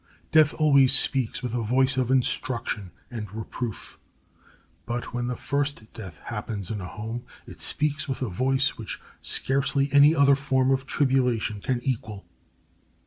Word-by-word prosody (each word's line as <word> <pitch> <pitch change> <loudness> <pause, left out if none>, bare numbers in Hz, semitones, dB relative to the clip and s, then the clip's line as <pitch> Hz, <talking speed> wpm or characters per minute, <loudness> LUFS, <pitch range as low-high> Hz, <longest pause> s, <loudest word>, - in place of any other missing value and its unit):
Death 155 -2 +5
always 140 -4 +5
speaks 130 -3 +3
with 125 -2 -3
a 120 - -1
voice 130 +4 +2
of 130 -2 0
instruction 125 -6 -1 0.2
and 105 -5 -6
reproof; 110 +1 -6 0.9
but 120 +1 -4
when 120 0 -2
the 125 - -2
first 140 -4 -2
death 95 -9 -9
happens 105 -4 -5
in 105 -3 -4
a 90 - -6
home 110 +5 -6 0.2
it - - -12
speaks 150 -1 -1
with 135 0 -2
a - - -1
voice 130 +8 0
which 110 - -6 0.2
scarcely 140 +1 +1
any 145 +3 +7
other 140 -2 +5
form 135 -1 +1
of 135 0 0
tribulation 125 -8 +1
can 125 +2 -1
equal. 110 -6 -3
130 Hz, 150 wpm, -25 LUFS, 110-135 Hz, 0.9 s, any